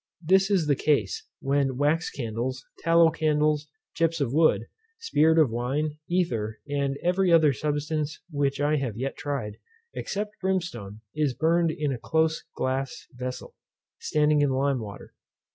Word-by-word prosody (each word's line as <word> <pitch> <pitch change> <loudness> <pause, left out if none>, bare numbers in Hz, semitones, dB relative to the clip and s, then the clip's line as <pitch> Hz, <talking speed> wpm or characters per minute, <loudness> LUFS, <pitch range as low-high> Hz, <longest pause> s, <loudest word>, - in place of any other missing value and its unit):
This 190 +3 +4
is 190 -6 +2
the 150 - +3
case, 155 - 0
when 135 -2 +1
wax 150 +4 +1
candles, 125 +1 -4
tallow 165 0 +5
candles, 150 -1 +1 0.3
chips 165 0 +1
of 135 -3 -1
wood, 160 +1 +3 0.3
spirit 160 - +3
of 155 -7 +4
wine, 145 +6 -2
ether, 115 -12 0
and 140 -1 -1
every 180 +1 +2
other 155 -4 +5
substance 150 +2 -2
which 140 -2 0
I 150 +1 +2
have 125 -7 -3
yet 135 +3 -3
tried, 135 -8 -4 0.4
except 210 +1 -4
brimstone, 165 - -3
is 150 -4 0
burned 165 +1 +2
in 150 -2 -1
a 125 - -5
close 160 +4 +1
glass 130 -2 -2
vessel, 125 +1 -6 0.5
standing 150 -1 +2
in 145 - +3
lime 135 0 +1
water. 105 -3 -9
150 Hz, 145 wpm, -26 LUFS, 135-160 Hz, 0.5 s, tallow